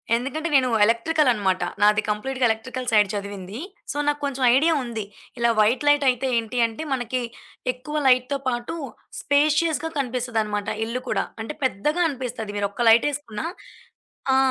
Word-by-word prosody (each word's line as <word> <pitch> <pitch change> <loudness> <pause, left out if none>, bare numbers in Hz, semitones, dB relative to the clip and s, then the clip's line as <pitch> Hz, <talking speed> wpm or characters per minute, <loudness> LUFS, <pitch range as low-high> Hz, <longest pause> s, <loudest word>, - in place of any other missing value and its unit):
ఎందుకంటే 280 +7 -2
నేను 260 -2 +4
ఎలక్ట్రికలన్నమాట. 230 - +2 0.2
నాది 210 +1 +5
కంప్లీట్‌గా 255 +5 -1
ఎలక్ట్రికల్ 250 +3 -3
సైడ్ 210 -2 +4
చదివింది. 200 0 -6 0.3
సో, - - -5
నాక్కొంచెం 285 -3 -1
ఐడియా 320 +4 +4
ఉంది. 230 -3 -4 0.4
ఇలా 235 0 +3
వైట్ 220 +6 +3
లైటయితే 270 -3 +3
ఏంటి 230 +2 -3
అంటే, 225 +7 -7
మనకి 250 0 -2 0.5
ఎక్కువ 280 +5 -6
లైట్‌తో 255 +2 +3
పాటు, 240 +4 -2 0.5
స్పేషియస్‌గా 310 +2 +2
కనిపిస్తదన్నమాట. 230 -5 -2 0.2
ఇల్లు 240 +3 -3
కూడా. - - 0 0.2
అంటే 265 +7 -5
పెద్దగా 280 - 0
అనిపిస్తది. 245 -6 -5
మీరు 205 0 +1
ఒక్క 235 +2 0
లైటేసుకున్న 235 -1 +1 0.9
ఆ! - - +5
250 Hz, 130 wpm, -23 LUFS, 220-280 Hz, 0.9 s, నాది